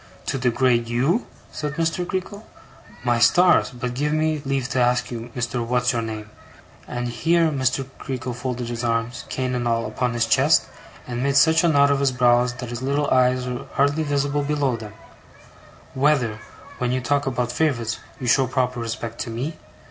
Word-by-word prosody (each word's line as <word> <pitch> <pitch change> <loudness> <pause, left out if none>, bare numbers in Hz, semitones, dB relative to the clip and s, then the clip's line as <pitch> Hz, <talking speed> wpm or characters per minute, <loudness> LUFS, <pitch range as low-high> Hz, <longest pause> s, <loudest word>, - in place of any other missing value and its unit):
'To 135 - -2
degrade 120 -1 +2
YOU?' 135 - +1 0.2
said 150 -1 -4
Mr. 165 +2 -1
Creakle. 195 +3 -4 0.6
'My 120 -1 +2
stars! 175 +10 +5
But 125 -1 -5
give 145 +4 -1
me 155 -1 0
leave 135 -2 -1
to 130 - 0
ask 125 0 +2
you, 115 0 -6
Mr. 120 0 -2
What's 125 +1 +1
your 120 - 0
name'; 110 -1 -6 0.6
and 120 0 -3
here 165 +8 +2
Mr. 135 -1 0
Creakle 125 -2 -4
folded 125 -1 -4
his 120 0 -4
arms, 115 +1 -1
cane 130 -1 -2
and 120 -1 -1
all, 115 0 +1
upon 120 +3 -2
his 115 -1 +2
chest, - - +4 0.4
and 120 0 -4
made 140 +1 +1
such 160 +4 +5
a - - +4
knot 140 -3 +4
of 140 - +2
his 140 -1 +2
brows 125 -1 +3
that 125 -1 -7
his 120 0 -5
little 140 +2 0
eyes 125 0 +3
were 125 -1 -5
hardly 145 +3 +2
visible 145 -1 0
below 145 -3 0
them; 110 -3 -9 1.0
'whether, 130 -6 +1 0.4
when 125 -1 0
you 130 - +1
talk 140 +3 0
about 125 -2 -1
favourites, 120 -5 0 0.2
you 130 - -5
showed 130 +1 +3
proper 125 -1 0
respect 115 0 -5
to 120 - -3
me? 130 +8 -4
125 Hz, 185 wpm, -23 LUFS, 120-140 Hz, 1.0 s, stars